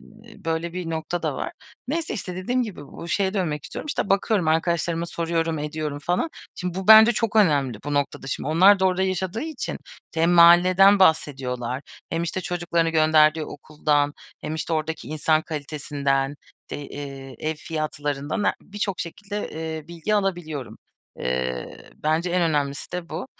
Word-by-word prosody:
n 220 -1 -17
böyle 165 +1 -2
bir 180 -2 -4
nokta 165 +2 -3
da - - -1
var. - - -4 0.4
Neyse, 325 +3 -2
işte, 185 -5 -5
dediğim 245 +7 0
gibi 185 -11 -7
bu 170 - -9
şeye 195 +2 0
dönmek 155 -7 -1
istiyorum, - - -7
işte, 280 - -2
bakıyorum 195 -3 +2
arkadaşlarıma 170 +1 +1
soruyorum, 165 -1 -1
ediyorum 150 -1 -3
falan. 180 - 0 0.2
Şimdi 180 -1 -4
bu 190 - -5
bence 220 +2 +10
çok 225 -1 -1
önemli, 140 - +3
bu 145 0 -2
noktada 140 -1 -1
şimdi. 135 - -3
Onlar 190 +6 +6
da 190 - +3
orada 185 0 +1
yaşadığı 190 +2 -1
için 315 +2 -4 0.4
hem 165 +1 +3
mahalleden 180 +3 +7
bahsediyorlar. 130 -7 +1 0.3
Hem, 165 +1 -1
işte, 170 +2 -2
çocuklarını 170 -2 0
gönderdiği 155 -1 +4
okuldan 145 0 0 0.3
hem, 155 - -4
işte, 160 +1 -3
oradaki 160 0 -2
insan 155 +1 +2
kalitesinden, 145 -2 -2 0.3
te - - -5
eee, 135 -2 -8
ev 155 +1 -2
fiyatlarından 150 +1 -3
he - - +3
birçok 200 -2 -4
şekilde, 205 +4 -5
eee, 160 -1 -5
bilgi 170 +5 -2
alabiliyorum. 175 - -2 0.4
Eee, 65 -1 -3
bence 160 +3 0
en 180 0 +2
önemlisi 145 -2 -1
de 180 -1 -4
bu, 165 +10 -5
165 Hz, 160 wpm, -24 LUFS, 150-185 Hz, 0.4 s, bence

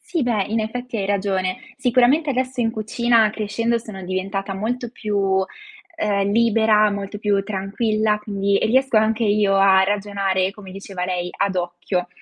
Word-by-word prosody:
Sì 335 -5 -2
beh, 230 -5 +1
in 225 +1 -1
effetti 245 +2 -4
hai 195 -2 -2
ragione. 190 -2 -1 0.2
Sicuramente 260 +4 +3
adesso 255 -1 -1
in 225 -1 +1
cucina 225 0 +2
crescendo 230 +2 -1
sono 215 -4 -9
diventata 195 +2 -3
molto 235 +4 -3
più, 200 -4 0 0.5
ehm, 200 -7 0
libera, 220 -2 +4
molto 200 0 -5
più 205 -1 +1
tranquilla, 210 +2 -1
quindi 200 -1 0
e - - +1
riesco 260 +1 +2
anche 220 +1 +2
io 205 -1 +2
a 190 -1 +5
ragionare 195 -2 0
come 195 -1 -12
diceva 195 -1 -6
lei, 180 -1 -2
ad 200 -1 0
occhio. 175 +1 -2
205 Hz, 155 wpm, -21 LUFS, 195-225 Hz, 0.5 s, a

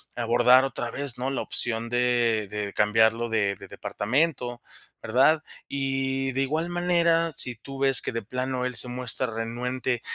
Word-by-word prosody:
abordar 120 +2 +4
otra 120 -2 -4
vez, 140 -2 +1
¿no?, 130 - -1
la 135 - -2
opción 115 -1 0
de 120 -3 +1
de 105 -1 -4
cambiarlo 110 +2 +2
de 100 -3 0
de - - -12
departamento, 125 0 -2 0.4
¿verdad?, 135 +7 +3 0.2
y 135 -1 -2
de 135 - -1
igual 155 +5 -1
manera, 170 -2 +2
si 125 -2 +2
tú 135 +4 -10
ves 135 -1 +5
que - - -3
de 115 - -2
plano 125 +3 -3
él 125 -1 -3
se 120 +2 0
muestra 125 +1 0
renuente 120 +2 -3
125 Hz, 160 wpm, -25 LUFS, 115-135 Hz, 0.4 s, ves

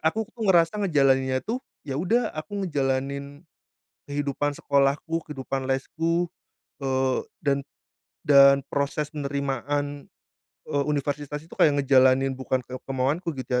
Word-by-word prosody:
aku 215 +8 +1
tuh 225 -4 -3
ngerasa 175 +3 +4
ngejalaninnya 135 -7 +2
tuh, 240 +4 -2 0.2
iya 140 +1 -3
sudah 230 +8 +1
aku 195 +6 -4
ngejalanin 140 0 -2 0.6
kehidupan 145 0 -1
sekolahku, 140 +4 +1
kehidupan 135 -2 -4
lesku, 165 +6 0 0.6
eee, 130 -1 +1 0.2
dan 140 -1 +2 0.6
dan 140 -1 +7
proses 145 +1 -1
penerimaan, 145 0 -3 0.6
eee, 145 -1 -1
universitas 145 0 -2
itu 165 - -22
kayak 145 -2 +4
ngejalanin 130 0 +4
bukan 130 -1 -2
ke 130 - -7
kemauanku 140 +5 -1
gitu 125 -1 -1
140 Hz, 120 wpm, -25 LUFS, 135-155 Hz, 0.6 s, dan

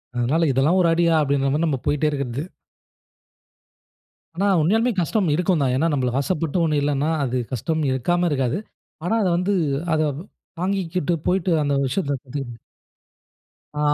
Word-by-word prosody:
அதனால 140 +8 +1
இதெல்லாம் 140 +8 +2
ஒரு 170 - +3
அடியா? 170 0 +3
அப்டின்ற 140 -1 +1
மாரி, 155 +3 +1
நம்ம 150 -4 0
போயிட்டே 150 +1 +1
இருக்குறது. 140 0 -3 1.9
ஆனா, 195 +4 +1
உண்மையாலுமே 225 +9 +2
கஷ்டம் 185 +3 0
இருக்கும் 175 -2 +1
தான். 130 -2 +1
ஏன்னா, 160 +6 +2
நம்மளுக்கு 130 -1 0
ஆசைப்பட்ட 165 +1 -1
ஒண்ணு 155 -2 +1
இல்லைன்னா, 145 +1 0
அது 130 -1 -1
கஷ்டம் 155 +6 -1
இருக்காம 175 +8 +1
இருக்காது. 130 -1 0 0.5
ஆனா 220 - +1
அத 195 - +1
வந்து 185 +3 0 0.4
அத 155 - +2 0.6
தாங்கிக்கிட்டு 180 -3 -1
போயிட்டு 185 -1 +1
அந்த 145 -1 0
விஷயத்தை 140 +2 -1
கத்து 140 +1 -6 1.4
ஆ, - - -3
155 Hz, 140 wpm, -22 LUFS, 135-175 Hz, 1.9 s, ஒரு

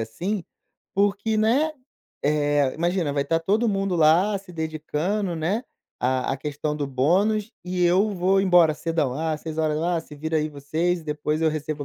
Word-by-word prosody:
assim, 170 - -3 0.5
porque, 205 +2 +1
né, 260 +9 +2 0.5
eh, 145 -2 +2
imagina, 170 -2 0
vai 140 -1 +1
estar 165 +3 +1
todo 215 +7 +1
mundo 195 -2 0
lá 170 +6 +4
se 190 -2 -14
dedicando, 160 +4 -2
né, 185 +10 -1 0.4
à 130 0 0
à - - -1
questão 150 +1 -3
do 145 -2 -2
bônus 195 - +1
e 180 0 0
eu 190 +5 +3
vou 190 +1 +2
embora 175 -5 +5
cedão. 155 -5 -1
"Ah, 155 +1 -1
18h. 155 -1 -2
Ah, 170 +1 0
se 155 - -13
vira 160 +2 -2
aí 155 0 0
vocês, 160 +4 -1
depois 150 +1 -2
eu 160 - +4
recebo 150 -1 -4
165 Hz, 165 wpm, -24 LUFS, 150-195 Hz, 0.5 s, embora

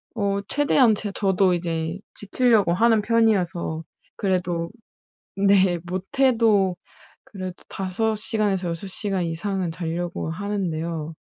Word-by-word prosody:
어 200 -2 0
최대한 275 -5 +4
제 205 -1 -5
저도 190 -2 +2
이제 165 0 -2 0.2
지키려고 210 -3 +2
하는 225 +3 +3
편이어서 190 -8 +1 0.3
그래도 175 -4 -1 0.7
네 195 -3 +4
못해도 205 0 +2 0.5
그래도 185 -3 -7
5 205 +4 -1
시간에서 205 -4 -1
6 170 +4 -4
시간 190 -1 -2
이상은 175 +1 -2
자려고 170 0 -3
하는데요. 165 -5 -3
190 Hz, 240 characters per minute, -24 LUFS, 175-210 Hz, 0.7 s, 최대한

